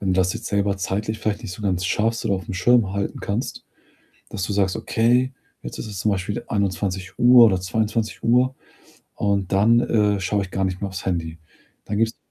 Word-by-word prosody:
wenn 95 -2 0
du - - 0
das 90 0 +2
jetzt - - -7
selber 100 -1 0
zeitlich 105 +3 -2
vielleicht 105 +1 -2
nicht 105 -6 -6
so 95 - -9
ganz 95 -3 -1
schaffst 115 +4 0
oder - - +1
aufm 95 0 -5
Schirm 105 +2 +3
halten 100 0 -3
kannst, 105 +5 -3 0.7
dass 95 - -3
du 100 - -3
sagst: 95 -2 +1
„Okay, 125 +3 +1 0.3
jetzt - - -7
ist - - -5
es 105 -3 -7
zum 105 +4 +1
Beispiel 100 +5 -3
21:00 100 +4 +3
oder 95 -4 +3
22:00 115 +5 0 0.6
und 100 -2 0
dann, 115 +4 +5
äh, 105 -4 +2
schaue 100 +2 0
ich 95 - -10
gar 95 0 0
nicht 95 0 -3
mehr 100 - -2
aufs 95 -1 -7
Handy.“ 85 -3 -2 0.5
Dann 105 - -3
gibt's 115 +1 0
100 Hz, 195 wpm, -22 LUFS, 95-110 Hz, 0.7 s, dann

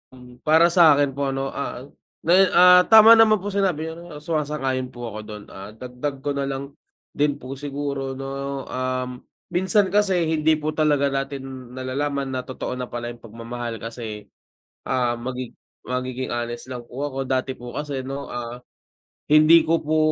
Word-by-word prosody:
hmm, 125 -1 -15
para 165 +3 +6
sakin 150 -5 +5
po 140 +1 -2
ano, 135 0 -2
ah, 135 -2 -5 0.4
na 165 - +1
me 190 +2 +6
ah, 180 +1 +8
tama 220 0 +9
naman 220 -1 +7
po 205 - -3
sinabi 180 -5 0
niyo 165 -2 -10
suma-sang 150 -3 -2
ayon 130 -1 -1
po 120 -2 -8
ako 110 - -7
dun, 105 -1 -8
ah, 100 +3 -10
dagdag 125 +3 -6
ko 145 - -1
nalang 140 0 -3 0.4
din 145 -1 +1
po 135 -1 -8
siguro 140 -2 -4
no, 135 0 -5
um, 130 -1 -3 0.3
minsan 190 +2 +2
kasi 195 -3 +2
hindi 160 -1 +2
po 155 0 -3
talaga 150 -2 +2
natin 135 -2 -5
nalalaman 135 +1 -2
na 130 - -2
totoo 130 0 -5
na 125 - -4
pala 120 0 -5
yung 120 - -13
pagmamahal 115 +1 -6
kasi, 110 -2 -7 0.6
ah, 120 -2 +1
magi 125 +1 -6 0.3
magiging 125 0 -3
honest 120 0 -4
lang 125 -2 -6
po 130 +4 -5
ako. 135 -1 -4
Dati 130 0 0
po 120 -1 -9
kasi 145 -3 -4
no, 135 +2 -5
ah, 120 0 -6 0.7
hindi 155 +2 +6
ko 165 +1 +2
po 155 +1 0
135 Hz, 170 wpm, -23 LUFS, 125-150 Hz, 0.7 s, tama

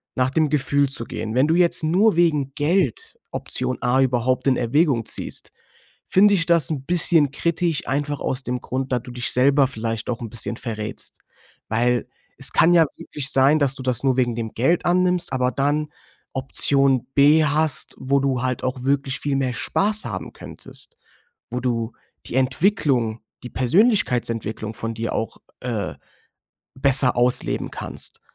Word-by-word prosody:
nach 130 0 +1
dem 155 0 +1
Gefühl 140 -1 +1
zu 115 - -3
gehen. 110 +1 -5
Wenn 130 +3 +4
du 160 - +2
jetzt 170 -2 +2
nur 185 +5 +3
wegen 150 -6 +1
Geld 150 - -1
Option 130 0 -1
A 125 +2 +2
überhaupt 125 +1 0
in 130 - +3
Erwägung 125 -1 +1
ziehst, - - -4 0.6
finde 205 +2 +5
ich 175 -2 0
das 170 -4 +2
'n 135 -3 -4
bisschen 165 -4 +3
kritisch, 170 0 -1
einfach 145 +1 -2
aus 130 0 -2
dem 125 0 -3
Grund, 130 +1 -4
da 125 - +2
du 125 - -11
dich 120 -3 -3
selber 135 +2 +3
vielleicht 115 -2 -4
auch 120 0 -3
'n 115 - -6
bisschen 115 0 -6
verrätst, 110 -3 -6 0.5
weil 120 +2 0 0.3
es - - +6
kann 175 +2 +4
ja 165 -2 +6
wirklich 135 -2 -5
sein, 135 +4 +4
dass 135 -2 +3
du 130 - -6
das 125 -1 +1
nur 130 -2 +2
wegen 120 -2 +1
dem 115 -1 -5
Geld 135 +9 +1
annimmst 180 -1 +1
aber 125 0 +1
dann 145 +2 -1 0.5
Option 135 -1 +2
B 150 +3 +5
hast, 150 0 0
wo 140 +1 +1
du 135 -3 0
halt 130 -1 -2
auch 130 0 -3
wirklich 140 0 -1
viel 145 -1 -1
mehr 130 -2 -1
Spaß 210 - 0
haben 100 -5 -6
könntest. - - -13 0.5
Wo 125 +1 -3
du 115 -2 -2 0.3
die - - -7
Entwicklung, 130 - +1 0.2
die 125 - -7
Persönlichkeitsentwicklung 120 - 0
von 115 +1 -5
dir 115 +1 -4
auch, 115 - -3 0.2
äh, 110 -10 -3 0.8
besser 130 -1 +5
ausleben 120 +1 0
kannst. - - -7
135 Hz, 165 wpm, -22 LUFS, 125-150 Hz, 0.8 s, es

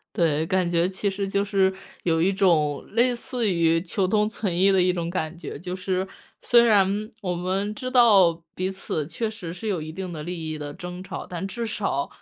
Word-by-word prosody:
对， 160 -2 +2
感 185 0 +1
觉 170 +1 +2
其 195 +2 -1
实 195 0 -3
就 200 +1 +1
是 195 -2 +2 0.3
有 165 -2 +2
一 190 +3 +3
种 160 -7 +2
类 240 +3 +3
似 240 -2 -2
于 165 -2 +3
求 185 +1 0
同 210 +2 +2
存 190 -6 -2
异 195 +2 +5
的 190 -1 +4
一 180 0 +3
种 170 -1 -3
感 170 -2 -3
觉。 165 -4 -7
就 180 +3 -5
是， 185 0 -2 0.3
虽 240 -1 +5
然 210 -5 +5 0.3
我 180 -4 -2
们 190 +4 -2
知 255 +4 -5
道 215 -9 +6 0.2
彼 185 +1 -2
此 190 -5 -3
确 220 +8 -2
实 210 -6 -7
是 180 +5 -8
有 190 -7 -1
一 155 - -6
定 180 +2 -6
的 155 - -6
利 165 -1 -5
益 155 - -3
的 145 -1 -6
争 180 +3 -7
吵， 190 +1 -7
但 180 +2 -5
至 235 +3 -4
少 195 -10 -1
185 Hz, 230 characters per minute, -25 LUFS, 170-200 Hz, 0.3 s, 道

